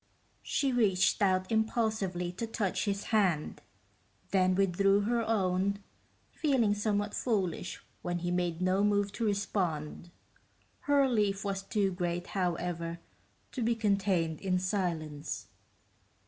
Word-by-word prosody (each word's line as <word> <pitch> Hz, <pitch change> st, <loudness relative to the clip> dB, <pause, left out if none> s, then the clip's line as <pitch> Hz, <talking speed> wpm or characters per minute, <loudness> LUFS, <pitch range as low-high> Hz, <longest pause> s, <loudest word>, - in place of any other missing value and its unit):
She 275 Hz, -2 st, 0 dB
reached 210 Hz, -4 st, +2 dB
out 185 Hz, -1 st, +2 dB
impulsively 220 Hz, -5 st, 0 dB
to 225 Hz, +6 st, -4 dB
touch 215 Hz, -3 st, -1 dB
his 200 Hz, -1 st, -1 dB
hand, 185 Hz, -8 st, +1 dB, 0.7 s
then 185 Hz, -1 st, +3 dB
withdrew 195 Hz, +1 st, +3 dB
her 235 Hz, +3 st, +1 dB
own, 200 Hz, -2 st, +1 dB, 0.5 s
feeling 260 Hz, -9 st, +2 dB
somewhat 205 Hz, 0 st, -1 dB
foolish 190 Hz, -7 st, -1 dB, 0.2 s
when 175 Hz, 0 st, -2 dB
he 175 Hz, 0 st, -2 dB
made 175 Hz, -1 st, -1 dB
no 185 Hz, +2 st, +2 dB
move 205 Hz, -1 st, +2 dB
to 230 Hz, +3 st, -2 dB
respond. 180 Hz, -6 st, -2 dB, 0.7 s
Her 285 Hz, -1 st, +3 dB
relief 210 Hz, -6 st, +1 dB
was 195 Hz, -1 st, -1 dB
too 195 Hz, -1 st, 0 dB
great, 175 Hz, -1 st, -2 dB
however, 175 Hz, -2 st, -2 dB, 0.5 s
to 255 Hz, -, -4 dB
be 230 Hz, +1 st, +2 dB
contained 195 Hz, -7 st, +1 dB
in 185 Hz, -2 st, +1 dB
silence. 165 Hz, -6 st, -3 dB
195 Hz, 120 wpm, -31 LUFS, 180-210 Hz, 0.7 s, then